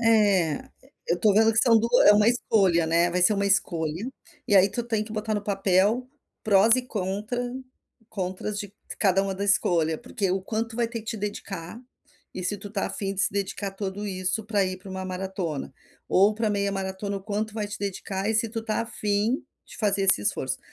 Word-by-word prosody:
É, 205 Hz, -8 st, +3 dB, 0.5 s
eu 170 Hz, -, +2 dB
estou 200 Hz, +4 st, +3 dB
vendo 225 Hz, +1 st, +5 dB
que 225 Hz, -, +1 dB
são 230 Hz, -2 st, +6 dB
duas 235 Hz, +2 st, +3 dB
é 205 Hz, -, +10 dB
uma 210 Hz, +2 st, +4 dB
escolha, 195 Hz, -8 st, +2 dB
né, 170 Hz, +2 st, +3 dB
vai 180 Hz, +1 st, +1 dB
ser 180 Hz, -, +6 dB
uma 200 Hz, 0 st, 0 dB
escolha, 175 Hz, 0 st, 0 dB, 0.4 s
e 205 Hz, -, +5 dB
aí 190 Hz, +1 st, +6 dB
tu 240 Hz, -, -2 dB
tem 220 Hz, -2 st, -1 dB
que 215 Hz, -, -10 dB
botar 215 Hz, 0 st, -2 dB
no 205 Hz, -, -2 dB
papel 200 Hz, +5 st, +1 dB, 0.3 s
prós 215 Hz, +2 st, +5 dB
e 255 Hz, -, -1 dB
contra 210 Hz, +1 st, -3 dB, 0.7 s
contras 190 Hz, +1 st, -4 dB
de 205 Hz, -1 st, -6 dB, 0.3 s
cada 195 Hz, -2 st, +3 dB
uma 195 Hz, -1 st, -2 dB
da 200 Hz, -, -3 dB
escolha, 170 Hz, -5 st, +2 dB
porque 235 Hz, -5 st, -2 dB
o 185 Hz, 0 st, -1 dB
quanto 225 Hz, +2 st, -3 dB
vai 235 Hz, -, +1 dB
ter 230 Hz, 0 st, -5 dB
que 220 Hz, -, -17 dB
te 230 Hz, -, -3 dB
dedicar, 200 Hz, -1 st, -6 dB, 0.5 s
e 185 Hz, -, -5 dB
se 205 Hz, +3 st, -1 dB
tu 205 Hz, +1 st, -8 dB
está 200 Hz, -1 st, -2 dB
a -, -, -5 dB
fim 195 Hz, -1 st, -3 dB
de 190 Hz, -, -1 dB
se -, -, +2 dB
dedicar 200 Hz, 0 st, -2 dB
a -, -, -6 dB
tudo 200 Hz, +1 st, -5 dB
isso 185 Hz, +2 st, -1 dB
para 205 Hz, -2 st, +1 dB
ir 185 Hz, 0 st, -4 dB
para 190 Hz, +1 st, -11 dB
uma 190 Hz, 0 st, -5 dB
maratona, 185 Hz, -6 st, -4 dB, 0.4 s
ou 200 Hz, +3 st, +4 dB
para 220 Hz, -1 st, 0 dB
meia 200 Hz, -1 st, 0 dB
maratona 195 Hz, +1 st, -3 dB
o -, -, -16 dB
quanto 215 Hz, +1 st, -3 dB
vai 210 Hz, -2 st, -3 dB
te 205 Hz, -, -6 dB
dedicar 195 Hz, 0 st, -3 dB
e 220 Hz, -, 0 dB
se 225 Hz, +1 st, +2 dB
tu 225 Hz, +1 st, -4 dB
está 220 Hz, -1 st, -2 dB
a -, -, -7 dB
fim 210 Hz, +3 st, -1 dB, 0.2 s
de -, -, -12 dB
fazer 200 Hz, -2 st, +1 dB
esse 105 Hz, -, +2 dB
esforço. -, -, -1 dB
200 Hz, 220 wpm, -26 LUFS, 190-220 Hz, 0.7 s, é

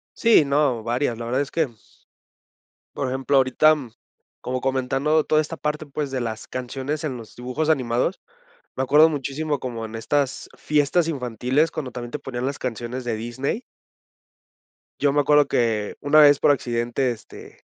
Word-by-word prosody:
Sí, 230 Hz, -9 st, +5 dB
no, 140 Hz, -4 st, +1 dB
varias, 120 Hz, +2 st, -1 dB
la 115 Hz, -, -6 dB
verdad 125 Hz, +3 st, 0 dB
es 140 Hz, -, -2 dB
que 150 Hz, -8 st, -1 dB, 1.2 s
por 135 Hz, -, -2 dB
ejemplo, 135 Hz, +1 st, +1 dB
ahorita, 145 Hz, +4 st, +4 dB
mm, 130 Hz, -7 st, -8 dB, 0.5 s
como 130 Hz, 0 st, -3 dB
comentando 135 Hz, +4 st, +1 dB
toda 155 Hz, -, +3 dB
esta 155 Hz, +1 st, -4 dB
parte, 150 Hz, 0 st, -3 dB
pues, 145 Hz, 0 st, -4 dB
de 130 Hz, -1 st, -2 dB
las 110 Hz, -2 st, -4 dB
canciones 135 Hz, +4 st, -4 dB
en 135 Hz, -5 st, -2 dB
los 115 Hz, -2 st, -11 dB
dibujos 125 Hz, +6 st, -3 dB
animados, 130 Hz, +3 st, 0 dB, 0.6 s
me 130 Hz, -, -1 dB
acuerdo 150 Hz, +4 st, +6 dB
muchísimo 145 Hz, 0 st, -2 dB
como 115 Hz, -3 st, -5 dB
en 110 Hz, 0 st, -8 dB
estas 135 Hz, +4 st, -1 dB
fiestas 150 Hz, +3 st, +1 dB
infantiles, 130 Hz, +1 st, 0 dB
cuando 135 Hz, -5 st, -5 dB
también 120 Hz, 0 st, -7 dB
te 150 Hz, -, -4 dB
ponían 125 Hz, -1 st, -4 dB
las 140 Hz, -, -3 dB
canciones 125 Hz, +1 st, -4 dB
de 120 Hz, -2 st, -2 dB
Disney 120 Hz, -, -3 dB, 1.4 s
yo 140 Hz, -1 st, +2 dB
me 145 Hz, -, +3 dB
acuerdo 145 Hz, 0 st, +4 dB
que 110 Hz, -3 st, 0 dB
una 150 Hz, +2 st, +5 dB
vez 145 Hz, -1 st, +7 dB
por -, -, +3 dB
accidente 120 Hz, -1 st, 0 dB
este 115 Hz, -3 st, -11 dB
135 Hz, 165 wpm, -23 LUFS, 120-150 Hz, 1.4 s, vez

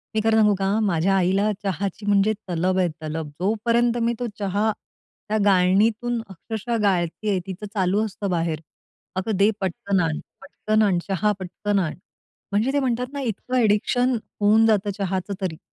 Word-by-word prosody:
मी 215 Hz, -, +2 dB
खरं 220 Hz, 0 st, +3 dB
सांगू 210 Hz, -1 st, +5 dB
का, 195 Hz, +2 st, 0 dB
माझ्या 195 Hz, -2 st, +2 dB
आईला 195 Hz, +3 st, +2 dB
चहाची 195 Hz, +2 st, -3 dB
म्हणजे 205 Hz, +1 st, +3 dB, 0.2 s
तलब 180 Hz, +2 st, 0 dB
आहे 180 Hz, -, +3 dB
तलब. 155 Hz, 0 st, -4 dB
जोपर्यंत 230 Hz, +4 st, +1 dB
मी 230 Hz, +1 st, +2 dB
तो 245 Hz, -, -2 dB
चहा 205 Hz, +2 st, +1 dB, 0.6 s
त्या 215 Hz, -, +1 dB
गाळणीतून 210 Hz, +5 st, +3 dB
अक्षरशः 220 Hz, +5 st, -4 dB
गाळत 175 Hz, -4 st, +2 dB, 0.2 s
आहे 200 Hz, -3 st, +2 dB
तीच 190 Hz, +1 st, -7 dB
चालू 200 Hz, +2 st, +1 dB
असतं 200 Hz, -1 st, -4 dB
बाहेर, 165 Hz, -3 st, -1 dB, 0.6 s
"अगं 190 Hz, +3 st, -1 dB
दे, 200 Hz, +2 st, +5 dB
पटकन 190 Hz, +1 st, -1 dB
आण, 160 Hz, -2 st, -1 dB, 0.2 s
पटकन 215 Hz, +3 st, -1 dB
आण 190 Hz, -4 st, +3 dB
चहा 200 Hz, +2 st, +1 dB
पटकन 200 Hz, +2 st, -1 dB
आण." 170 Hz, -5 st, -2 dB, 0.6 s
म्हणजे 215 Hz, +7 st, +1 dB
ते 285 Hz, -, +3 dB
म्हणतात 250 Hz, -2 st, 0 dB
ना, 280 Hz, -, -3 dB
इतकं 250 Hz, +1 st, -3 dB
एडिक्शन 245 Hz, +3 st, +2 dB, 0.3 s
होऊन 215 Hz, +2 st, +5 dB
जातं 210 Hz, -2 st, +2 dB
चहाचं 190 Hz, 0 st, -2 dB
तरी. 175 Hz, -5 st, -2 dB
200 Hz, 165 wpm, -23 LUFS, 185-220 Hz, 0.6 s, सांगू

